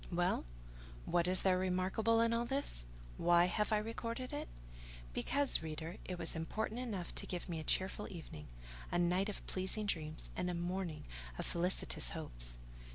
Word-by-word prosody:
Well! 175 - +1 0.6
what 175 0 +2
is 185 +1 +3
there 185 -1 +4
remarkable 190 +5 +2
in 230 0 +3
all 235 +1 +1
this? 265 - +3 0.3
Why 175 0 +5
have 210 +4 +1
I 215 - +5
recorded 230 +3 -3
it? - - -3 0.7
Because, 280 - +2
reader, 160 +2 -5
it 180 - -4
was 170 -1 +2
important 215 +8 -2
enough 210 -8 -3
to - - -1
give 180 -1 -3
me 170 -3 -3
a - - -4
cheerful 190 +5 +1
evening, 160 - -8 0.4
a - - +2
night 180 +3 +2
of 205 - -6
pleasing 190 +3 +1
dreams, 155 -5 -2
and 180 - -1
a 175 - -1
morning 175 -1 -2 0.3
of - - -2
felicitous 170 - +2
hopes. - - -3
180 Hz, 165 wpm, -37 LUFS, 170-210 Hz, 0.7 s, Why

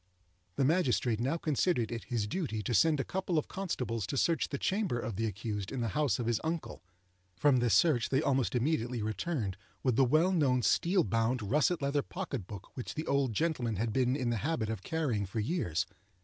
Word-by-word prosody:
The 135 - +2
magistrate 130 - +2
now 135 +7 0
considered 150 -6 0
it 115 -1 -5
his 115 -4 -1
duty 110 - -3
to 120 - -2
send 150 - +4
a - - +1
couple 185 0 -2
of 155 - 0
constables 125 - -3
to 140 - -3
search 165 +1 +2
the 140 - -3
chamber 190 - 0
of 115 -3 -4
the 110 +3 0
accused 105 -1 -4
in 130 - -3
the 115 - 0
house 140 -5 +1
of 120 - -3
his 115 -1 0
uncle. 165 0 -3 0.5
From 145 +2 +4
this 120 -2 +3
search 145 -9 +3
they 135 - +2
almost 135 -4 +1
immediately 120 -3 0
returned 110 - -2 0.3
with 125 -4 +2
the 135 - +6
well 155 +8 +3
known 135 -8 +2
steel 180 - +3
bound, 115 0 0
russet 150 - +1
leather 140 +1 +1
pocket 140 - -5
book 100 -2 -10
which 125 - -6
the 155 - -3
old 140 -4 +1
gentleman 125 -5 0
had 110 +2 -1
been 130 0 +2
in 125 -4 -1
the 115 - 0
habit 120 -3 -1
of 110 -4 -4
carrying 125 - -1
for 110 +4 -3
years. 105 - 0
125 Hz, 205 wpm, -31 LUFS, 115-155 Hz, 0.5 s, the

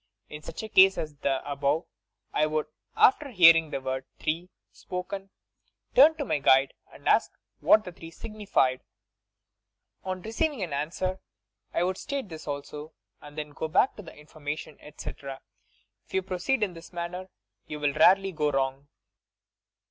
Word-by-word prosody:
In 150 - -8
such 155 - -7
a 220 - -6
ease 190 0 +7
as 155 -2 -4
the 135 -1 -1
above 145 +3 0 0.5
I 155 - +2
would, 155 0 -1 0.3
after 280 +2 +5
hearing 165 - +7
the 135 - -3
word 130 0 -3
'three' 165 +4 -2 0.2
spoken, 195 +2 -6 0.6
turn 300 +5 +7
to 290 - -2
my 150 - 0
guide 135 0 +4 0.2
and - - -11
ask - - +4 0.3
what 215 - +5
the 180 - -7
three 165 -1 -11
signified. 180 - -1 1.2
On 185 -1 -4
receiving 255 +1 -1
an 165 -5 -4
answer, 175 +6 -2 0.5
I - - +1
would 185 +1 -1
state 275 -7 -4
this 160 -2 -9
also, 145 +2 -6 0.3
and 145 +1 -13
then 150 -1 -5
go 160 - -4
back 205 +11 +3
for - - -9
further 175 - -12
information, 150 0 -7
etc. 140 -2 -8 0.7
If - - -8
you 190 - +2
proceed 190 +7 0
in 195 -4 -1
this 165 0 -12
manner 180 +2 -5 0.4
you 150 - -6
will 145 -1 +1
rarely 190 +5 +5
go 150 -3 0
wrong. 135 0 -1
165 Hz, 160 wpm, -27 LUFS, 145-190 Hz, 1.2 s, ease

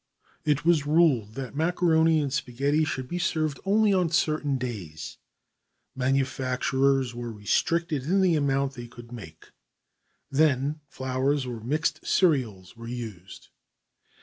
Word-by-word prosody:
It 150 0 +1
was 160 -4 +3
ruled 145 -10 +3
that 135 0 -6
macaroni 160 0 +3
and 140 -2 -2
spaghetti 140 +3 0
could 130 -5 -4
be 175 +4 -3
served 155 -5 -1
only 210 +1 +3
on 180 -3 +2
certain 155 -4 +1
days. 100 -12 -6 0.8
Manufacturers 130 0 +1
were 120 0 -5
restricted 150 +8 0
in 190 +5 +2
the 180 -3 +3
amount 140 -2 +1
they 120 -2 -8
could 120 0 -13
make. 80 -10 -11 0.8
Then 145 0 +2
flours 130 +1 -1
of 120 -3 -6
mixed 155 +7 -1
cereals 115 - +1
were 115 0 -10
used. 110 -7 -8
135 Hz, 125 wpm, -26 LUFS, 120-155 Hz, 0.8 s, was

